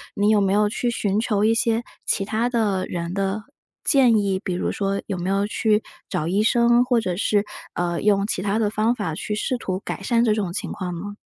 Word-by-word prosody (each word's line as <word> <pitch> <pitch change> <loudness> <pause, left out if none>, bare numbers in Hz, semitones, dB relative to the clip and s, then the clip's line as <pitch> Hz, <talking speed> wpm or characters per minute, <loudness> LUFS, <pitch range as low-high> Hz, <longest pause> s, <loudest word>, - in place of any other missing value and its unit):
你 205 +1 +2
有 215 -1 +4
没 195 -1 +2
有 210 +1 +3
去 240 +3 -1
寻 205 -3 0
求 210 -3 0
一 225 - +4
些 230 0 +1 0.2
其 195 - 0
他 220 +4 0
的 210 -6 0
人 170 0 -4
的 195 +2 -1 0.4
建 255 -6 +5
议？ 195 -2 0
比 185 - -2
如 175 - -1
说 195 0 -1
有 195 - -3
没 180 +1 -3
有 195 +1 +1
去 215 0 +1 0.3
找 155 - -2
医 195 +4 +2
生， 240 +1 +4
或 245 -1 +2
者 185 -5 -2
是， 205 +2 +1 0.3
呃， 175 -1 -1
用 200 -1 +3
其 185 - -2
它 200 +2 0
的 215 -2 +2
方 215 +2 +2
法 205 -9 -3
去 210 - -4
试 250 +4 -1
图 185 -5 -3
改 - - -4
善 235 +3 +2
这 215 - +3
种 205 -5 -2
情 180 - -4
况 180 -2 -4
呢？ 205 +3 -6
205 Hz, 245 characters per minute, -23 LUFS, 195-225 Hz, 0.4 s, 建